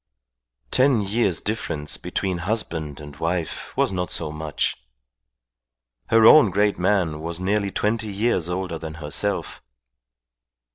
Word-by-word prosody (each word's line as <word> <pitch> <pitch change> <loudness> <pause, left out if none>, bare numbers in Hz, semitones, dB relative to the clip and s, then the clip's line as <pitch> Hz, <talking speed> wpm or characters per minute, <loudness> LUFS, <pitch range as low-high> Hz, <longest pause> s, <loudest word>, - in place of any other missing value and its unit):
Ten 130 -3 +4
years' 100 -3 0
difference 80 -9 -3
between 95 -2 -2
husband 85 -7 -2
and 75 -1 -10
wife 85 -1 -3
was - - +2
not 90 -2 -2
so 75 - -2
much. 75 -1 -2 1.3
Her 115 -1 +5
own 130 -2 +8
great 100 +2 +1
man 90 -5 +1
was 85 +1 -4
nearly 100 +2 0
twenty 110 +3 -1
years 100 -4 0
older 90 -2 -3
than 80 -1 -7
herself. 80 +6 -3
90 Hz, 125 wpm, -23 LUFS, 80-105 Hz, 1.3 s, own